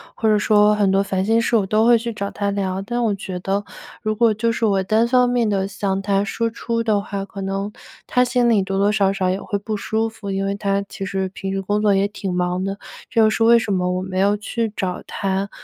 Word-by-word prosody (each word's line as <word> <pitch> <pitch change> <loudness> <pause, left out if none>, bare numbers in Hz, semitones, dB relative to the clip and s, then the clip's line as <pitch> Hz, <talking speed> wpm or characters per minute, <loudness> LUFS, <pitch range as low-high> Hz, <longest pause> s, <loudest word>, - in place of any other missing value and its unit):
或 220 - +1
者 215 - +4
说 210 0 +4
很 205 -2 +2
多 195 0 +3
烦 190 -1 -1
心 225 +2 +3
事 230 - +1
我 210 -4 +3
都 215 +3 +2
会 240 - +6
去 230 +1 -4
找 200 -1 -4
他 200 -1 -2
聊。 195 -1 -2
但 240 +4 -3
我 215 -3 +1
觉 190 -2 -6
得， 195 +2 -1 0.4
如 215 -1 -1
果 230 0 +3
就 230 +2 0
是 230 0 -1
我 195 -3 +2
单 220 +4 +2
方 250 0 +3
面 240 -3 +1
地 195 -1 0
向 195 0 -2
他 200 0 +1
输 230 +3 -1
出 230 0 -3
的 215 -3 +1
话， 200 -1 -5
可 195 0 -8
能， 195 +1 -3 0.3
他 250 - +2
心 245 -1 +2
里 220 -4 +4
多 195 0 -3
多 200 +1 +3
少 200 -2 +2
少 190 -2 0
也 190 +2 -1
会 205 - -2
不 215 +2 -4
舒 220 +2 -1
服， 220 -2 -9
因 195 0 -1
为 200 0 -1
他 200 -1 0
其 195 - -6
实 190 -1 -2
平 190 0 -5
时 195 - -1
工 205 +2 -1
作 205 -2 +3
也 195 +1 +2
挺 200 -2 -5
忙 180 +1 -1
的， 195 +1 -3 0.3
这 225 - +2
又 215 - +5
是 225 +1 0
为 235 +1 +7
什 215 -3 -2
么 180 -1 0
我 185 - -2
没 185 0 -3
有 200 +2 +3
去 225 +1 -3
找 180 -2 -3
他， 195 0 -2
200 Hz, 280 characters per minute, -21 LUFS, 195-220 Hz, 0.4 s, 为